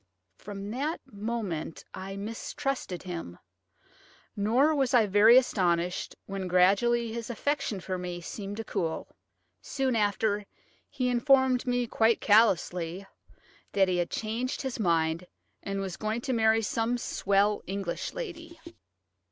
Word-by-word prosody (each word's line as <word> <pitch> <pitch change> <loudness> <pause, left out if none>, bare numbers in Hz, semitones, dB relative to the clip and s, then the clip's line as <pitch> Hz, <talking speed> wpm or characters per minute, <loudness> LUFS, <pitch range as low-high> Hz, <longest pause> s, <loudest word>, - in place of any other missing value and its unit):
From 200 0 -7
that 290 +7 -2
moment 205 -7 -4
I 195 +1 -6
mistrusted 225 0 -4
him, 170 - -6 1.0
nor 240 +9 +3
was 270 -4 +2
I 230 -3 +6
very 210 +4 +7
astonished 180 -8 +1
when 195 -1 -4
gradually 210 +6 +3
his 235 0 -5
affection 240 -3 -1
for 185 0 -4
me 180 -1 -5
seemed 200 +3 -6
to 225 - -3
cool. 165 -6 -3 0.5
Soon 265 -3 -1
after, 205 -1 +1 0.4
he 255 -3 -1
informed 255 +1 +3
me, 245 0 +1
quite 225 0 +2
callously, 190 -4 +2 0.7
that 195 -1 +4
he 180 - +1
had 175 -1 0
changed 235 +6 -3
his 265 -3 -4
mind, 165 -2 +1 0.3
and 195 0 -3
was 190 -3 -4
going 215 +2 -2
to 260 +1 -2
marry 225 -1 +3
some 230 +3 0
swell 200 -2 +1
English 195 -2 -3
lady. 340 -9 -7
215 Hz, 130 wpm, -28 LUFS, 190-245 Hz, 1.0 s, very